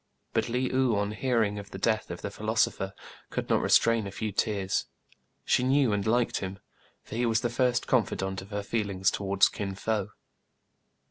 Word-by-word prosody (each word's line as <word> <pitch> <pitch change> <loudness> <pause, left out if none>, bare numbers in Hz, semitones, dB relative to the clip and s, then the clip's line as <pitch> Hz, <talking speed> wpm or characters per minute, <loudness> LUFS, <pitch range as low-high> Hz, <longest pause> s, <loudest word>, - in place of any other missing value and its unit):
But - - +1
Le 125 +2 -1
ou, 130 -3 +3
on 100 0 0
hearing 110 -3 0
of 100 - -9
the - - -7
death 110 -2 0
of 85 - -7
the 100 - -3
phil 110 +1 -8
osopher, 100 -3 +1 0.4
could - - -4
not - - +4
restrain 115 -3 +4
a - - -6
few 110 +1 -3
tears. 100 -1 0 0.6
She - - +3
knew 130 -2 +3
and 105 +1 -1
liked 120 +1 +2
him; 95 0 -5 0.5
for - - -11
he 120 +1 +1
was 115 -1 +2
the 120 - -1
first 125 0 +1
confidant 95 -6 0
of 95 - -12
her 105 -1 -3
feelings 100 -3 0
towards 100 -1 +3
Kin 100 -1 -4
Fo. 105 0 -1
110 Hz, 190 wpm, -28 LUFS, 100-120 Hz, 0.6 s, not